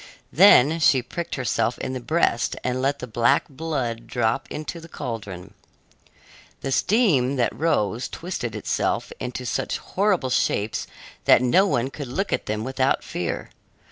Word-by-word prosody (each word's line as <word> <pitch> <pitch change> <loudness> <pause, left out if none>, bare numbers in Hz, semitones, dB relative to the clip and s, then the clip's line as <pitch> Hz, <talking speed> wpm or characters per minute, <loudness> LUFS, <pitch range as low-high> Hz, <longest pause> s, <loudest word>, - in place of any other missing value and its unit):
Then 165 -4 +6
she 135 -5 +4
pricked 170 +7 -5
herself 120 -3 0
in 130 - -4
the 130 - -3
breast 125 -3 +1
and 125 0 -1
let 140 +2 +1
the - - -6
black 120 0 +2
blood 135 -6 -4
drop 120 +1 0
into 155 +3 -5
the 165 0 -12
caldron. 105 - -6 1.1
The 135 - -3
steam 145 - +2
that 120 -3 0
rose 120 - 0
twisted 165 - -5
itself 105 - -1
into 125 0 -5
such - - -2
horrible 190 -9 0
shapes 110 -4 0 0.4
that - - +6
no 185 +11 +4
one 130 -6 0
could 145 -2 -6
look 195 +12 -2
at - - -2
them 110 0 -2
without 130 +1 0
fear. - - -4
130 Hz, 150 wpm, -24 LUFS, 120-160 Hz, 1.1 s, Then